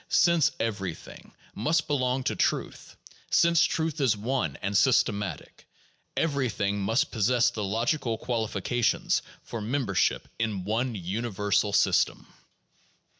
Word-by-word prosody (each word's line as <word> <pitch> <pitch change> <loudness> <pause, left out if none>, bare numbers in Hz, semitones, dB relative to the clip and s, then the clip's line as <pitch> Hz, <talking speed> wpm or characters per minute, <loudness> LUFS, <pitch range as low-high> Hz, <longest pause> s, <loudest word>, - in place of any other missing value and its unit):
Since 170 -4 +4
everything 100 -6 -5 0.2
must 160 - +1
belong 130 -2 0
to 110 - -1
truth, - - -2 0.3
and - - -1
since 170 0 +5
truth 160 -2 -1
is 120 -6 +2
one 105 - -2
and 100 +1 -2
systematic, 100 - +1 0.5
everything 125 -10 0
must 115 +10 +1
possess 120 +1 +2
the 105 - -4
logical 115 +4 -1
qualifications 115 0 0 0.2
for 115 - -6
membership 115 -4 0
in 110 -5 -1
one 115 +4 -1
universal 105 +1 -1
system. 100 -3 +2
115 Hz, 115 wpm, -27 LUFS, 100-130 Hz, 0.5 s, since